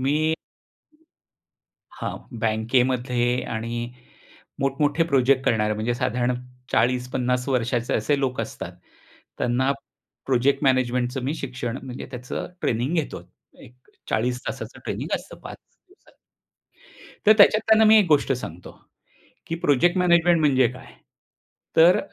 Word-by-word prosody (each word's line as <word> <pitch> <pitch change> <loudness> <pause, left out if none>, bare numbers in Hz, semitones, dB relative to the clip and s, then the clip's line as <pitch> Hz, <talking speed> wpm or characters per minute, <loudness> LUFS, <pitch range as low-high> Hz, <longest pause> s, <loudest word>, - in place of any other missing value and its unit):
मी 155 +4 +1 1.5
हां, - - -5 0.3
बँकेमध्ये 120 +2 +1 0.3
आणि 120 +1 -4 0.7
मोठ-मोठे 145 +4 +1
प्रोजेक्ट 135 0 +3
करणारे, 105 -2 +1
म्हणजे 110 +3 -1
साधारण 125 +1 0 0.4
40-50 125 +1 0
वर्षाचे 120 -2 0
असे 145 -2 +1
लोक 130 -2 -1
असतात, - - -6 0.7
त्यांना 125 +3 +1 0.6
प्रोजेक्ट 135 +2 +2
मॅनेजमेंटचं 125 -1 +1
मी 145 +4 -1
शिक्षण 125 -3 -5
म्हणजे 130 -1 -7
त्याचं 125 0 -5 0.2
ट्रेनिंग 125 +7 0
घेतो, 160 -4 -2 0.4
एक 120 - -15 0.4
40 125 +3 0
तासाचं - - -6
ट्रेनिंग - - -3
असतं - - -12
5 - - -8 0.3
दिवसात. 380 - -25 1.1
तर 215 - +9
त्याच्यात 210 +1 +7
त्यांना 220 0 +6
मी 220 +1 +7
एक 200 - +3
गोष्ट 150 -3 +3
सांगतो, 90 -9 -7 0.8
की 165 - -2
प्रोजेक्ट 170 +3 +2
मॅनेजमेंट 175 -1 +4
म्हणजे 130 -5 +4
काय? 125 - -13 0.9
तर, 170 +3 +7
130 Hz, 115 wpm, -24 LUFS, 120-145 Hz, 1.5 s, तर